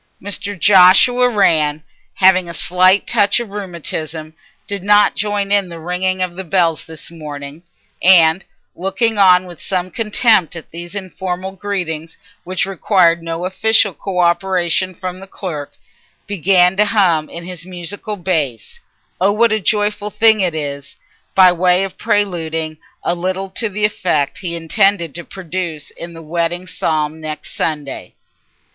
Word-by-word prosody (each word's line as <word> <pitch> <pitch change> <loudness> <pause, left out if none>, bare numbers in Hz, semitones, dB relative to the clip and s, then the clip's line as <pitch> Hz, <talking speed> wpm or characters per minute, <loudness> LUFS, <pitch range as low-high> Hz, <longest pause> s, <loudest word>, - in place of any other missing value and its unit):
Mr. 205 0 -4
Joshua 205 +7 +6
Rann, 155 -8 +2 0.3
having 185 -2 +4
a 170 - -6
slight 185 +2 +3
touch 200 +2 +2
of 235 -3 -6
rheumatism, 160 -5 -6 0.3
did 200 -2 -5
not 205 0 +4
join 205 0 -2
in 200 -3 +2
the 170 - -8
ringing 185 +2 -1
of 180 -1 -4
the 190 - -5
bells 170 -3 +1
this 160 +1 -10
morning, 150 -2 -8 0.4
and, 175 -1 +5 0.3
looking 195 +4 -1
on 185 -2 +5
with 175 -2 -12
some 185 -1 -2
contempt 215 -5 +2
at 165 - -10
these 175 +3 -9
informal 190 -1 -5
greetings 175 -5 -5 0.3
which 185 -1 -2
required 185 -3 +2
no 165 +1 -4
official 215 +1 +3
co 190 +1 -6
operation 180 +1 +1
from 185 +1 -6
the 195 - -11
clerk, 160 -7 -6 0.5
began 185 -1 +3
to 210 - +4
hum 180 -7 +2
in 170 - -8
his 180 -2 -8
musical 185 +4 -5
bass, 155 - -2 0.4
"Oh 195 +2 +4
what 225 +2 +2
a 220 - +1
joyful 210 0 0
thing 220 0 +4
it 175 -4 0
is," 140 -2 -5 0.4
by 185 -1 +7
way 180 +1 +2
of 190 -1 -7
preluding 165 -7 -1 0.2
a - - +1
little 185 +2 -3
to 225 +2 -1
the 210 +1 0
effect 165 -8 -1
he 170 -2 -4
intended 170 -1 +1
to 170 - -7
produce 170 -5 -6
in 170 0 -10
the 165 - -10
wedding 170 +2 -2
psalm 155 -3 -2
next 155 -1 -6
Sunday. 150 -4 -4
180 Hz, 150 wpm, -17 LUFS, 165-195 Hz, 0.5 s, by